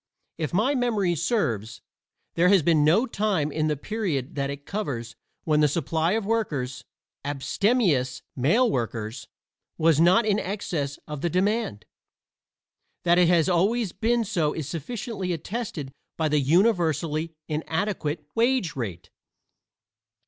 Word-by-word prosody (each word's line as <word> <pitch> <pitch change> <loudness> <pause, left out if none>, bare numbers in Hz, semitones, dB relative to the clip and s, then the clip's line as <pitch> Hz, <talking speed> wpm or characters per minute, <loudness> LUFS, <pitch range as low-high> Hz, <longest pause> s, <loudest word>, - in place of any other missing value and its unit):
If 155 -3 -2
my 220 +10 +2
memory 225 -9 +1
serves, 155 - -1 0.5
there 175 +2 +3
has 195 -5 +5
been 155 -2 +4
no 175 - +4
time 200 - 0
in 155 +1 0
the 150 -1 0
period 165 - -3
that 140 -1 -2
it 140 0 -7
covers 135 - -4 0.3
when 155 -2 +2
the 150 - +5
supply 160 +3 0
of 220 -2 -1
workers 150 - -2 0.4
abstemious 145 - +1
male 185 - +3
workers 115 - -3 0.5
was 160 -2 +3
not 185 +7 +5
in 210 -1 +2
excess 175 -8 -3
of 150 -3 -6
the 170 - 0
demand. 190 - 0 1.2
That 175 0 +4
it 180 - +5
has 170 -2 +4
always 195 +4 +2
been 230 +3 +1
so 170 -8 0
is 155 -4 -4
sufficiently 185 - -4
attested 165 - -5 0.3
by 160 -1 +1
the 150 0 +3
universally 160 - +1
inadequate 160 -1 -2
wage 235 -6 +1
rate. 100 -10 -5
165 Hz, 135 wpm, -25 LUFS, 145-210 Hz, 1.2 s, has